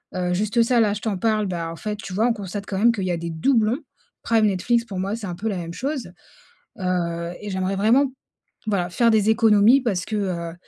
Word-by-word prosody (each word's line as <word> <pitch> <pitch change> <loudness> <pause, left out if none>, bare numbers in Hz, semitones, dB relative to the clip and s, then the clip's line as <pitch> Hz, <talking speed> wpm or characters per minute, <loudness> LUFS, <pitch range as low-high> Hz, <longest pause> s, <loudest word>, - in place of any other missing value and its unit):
Heu, 180 -1 -1
juste 215 +5 +1
ça 235 +1 +2
là 205 -2 +2
je 210 - -5
t'en 210 -4 -2
parle, 215 0 +1
bah, 170 -3 -3
en - - -7
fait, 210 +3 -4
tu 195 -2 -8
vois, 220 +5 +2
on 240 - +2
constate 200 -1 -6
quand 195 - -3
même 235 +2 +5
qu'il 200 -4 -3
y 185 - 0
a 170 - -1
des 170 0 -5
doublons. 225 - +1 0.4
Prime, 225 -2 +3
Netflix, 230 +5 +1
pour 195 -4 -6
moi 195 +3 -2
c'est 220 - -7
un 175 - -4
peu 220 +5 -3
la 195 - -2
même 170 -1 -6
chose. 265 -5 -4 0.7
Heu 170 -2 -2
et 210 - -6
j'aimerais 190 0 -1
vraiment, 250 +7 +3 0.6
voilà, 185 -4 0
faire 230 +5 +3
des 215 -1 +3
économies 220 +3 +5
parce 195 -7 -1
que, 215 - -4
heu, 170 -4 -3
205 Hz, 235 wpm, -23 LUFS, 180-225 Hz, 0.7 s, même